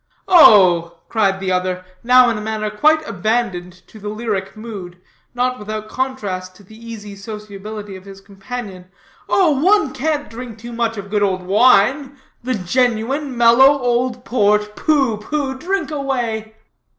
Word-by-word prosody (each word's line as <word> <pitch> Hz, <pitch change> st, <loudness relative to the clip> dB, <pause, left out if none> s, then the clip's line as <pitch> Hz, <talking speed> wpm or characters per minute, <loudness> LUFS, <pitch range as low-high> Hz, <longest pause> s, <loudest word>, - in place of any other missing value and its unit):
"Oh," 180 Hz, -, +6 dB
cried 200 Hz, -4 st, +1 dB
the 190 Hz, -1 st, -2 dB
other, 185 Hz, 0 st, -2 dB, 0.2 s
now 250 Hz, +1 st, +6 dB
in 210 Hz, -2 st, -4 dB
manner 215 Hz, -1 st, -3 dB
quite 310 Hz, +8 st, +2 dB
abandoned 180 Hz, -3 st, -2 dB
to 220 Hz, -, -14 dB
the 210 Hz, 0 st, -6 dB
lyric 215 Hz, -2 st, -4 dB
mood, 195 Hz, -6 st, -9 dB, 0.4 s
not 250 Hz, +1 st, -1 dB
without 215 Hz, +1 st, -6 dB
contrast 205 Hz, -9 st, -4 dB
to 200 Hz, -, -18 dB
the 215 Hz, +3 st, -16 dB
easy 220 Hz, -3 st, -9 dB
sociability 210 Hz, 0 st, -8 dB
of 190 Hz, 0 st, -12 dB
his 195 Hz, -1 st, -11 dB
companion. 195 Hz, -1 st, -8 dB, 0.4 s
"Oh, 370 Hz, -5 st, +3 dB
one 370 Hz, -6 st, +3 dB
can't 295 Hz, +2 st, -2 dB
drink 230 Hz, 0 st, -9 dB
too 235 Hz, +2 st, -9 dB
much 230 Hz, -1 st, -2 dB
of 200 Hz, 0 st, -8 dB
good 210 Hz, -1 st, 0 dB
old 185 Hz, -2 st, 0 dB
wine 255 Hz, +7 st, +3 dB, 0.2 s
the 255 Hz, +1 st, -2 dB
genuine, 245 Hz, -, -1 dB
mellow 245 Hz, +4 st, +6 dB
old 245 Hz, 0 st, -1 dB
port. 210 Hz, -2 st, +1 dB
Pooh, 275 Hz, -8 st, +1 dB
pooh! 270 Hz, +4 st, -3 dB
drink 380 Hz, +1 st, -2 dB
away." 240 Hz, -6 st, -3 dB
220 Hz, 150 wpm, -18 LUFS, 200-255 Hz, 0.4 s, Oh